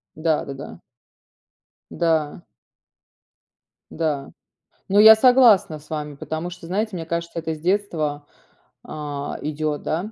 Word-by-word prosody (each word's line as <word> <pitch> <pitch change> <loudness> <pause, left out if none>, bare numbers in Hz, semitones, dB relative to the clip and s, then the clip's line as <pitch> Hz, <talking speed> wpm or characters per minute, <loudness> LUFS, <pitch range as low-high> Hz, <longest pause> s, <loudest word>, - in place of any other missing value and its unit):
Да-да-да. 150 -3 -3 1.1
Да. 160 -2 0 1.5
Да. 150 -4 -2 0.6
Ну, 200 +2 +2
я 220 +1 +10
согласна 235 -9 +5
с 150 - -19
вами, 150 -2 -4
потому 160 +4 -5
что, 175 -1 -11
знаете, 210 +5 -1
мне 165 -2 -5
кажется 170 0 -4
это 160 -1 -3
с 155 - -11
детства, 165 -6 -1 0.6
а, 145 -1 -6
идёт, 150 0 -3
да. 180 +7 -3
160 Hz, 115 wpm, -22 LUFS, 150-180 Hz, 1.5 s, я